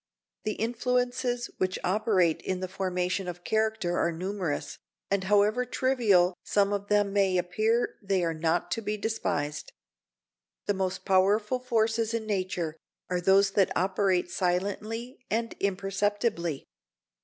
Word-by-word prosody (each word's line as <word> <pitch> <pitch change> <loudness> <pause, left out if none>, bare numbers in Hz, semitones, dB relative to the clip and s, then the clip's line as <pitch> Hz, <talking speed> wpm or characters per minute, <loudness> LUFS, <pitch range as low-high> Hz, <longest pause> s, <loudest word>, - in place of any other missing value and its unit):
The 215 - 0
influences 245 +1 -1
which 185 0 0
operate 185 -4 +2
in 185 -1 -2
the 185 - -3
formation 185 0 -2
of 175 0 -6
character 220 -5 0
are 170 - +2
numerous, 180 -2 -3 0.3
and 195 -1 +1
however 210 +4 +3
trivial 225 -8 +3
some 200 0 +2
of 200 0 -3
them 205 -1 +2
may 195 -2 +3
appear 215 +7 0
they 195 -3 0
are 165 -1 0
not 165 +2 0
to 225 - -1
be 210 0 -2
despised. 150 -9 -2 0.9
The 205 - +1
most 190 -1 -2
powerful 205 +5 +3
forces 230 -2 +1
in 225 -1 -3
nature 185 -6 -2 0.4
are 180 -1 0
those 195 +2 +4
that 195 -1 +3
operate 185 -1 +1
silently 210 +7 -2
and 230 +1 -1
imperceptibly. 200 - -1
200 Hz, 130 wpm, -28 LUFS, 180-220 Hz, 0.9 s, those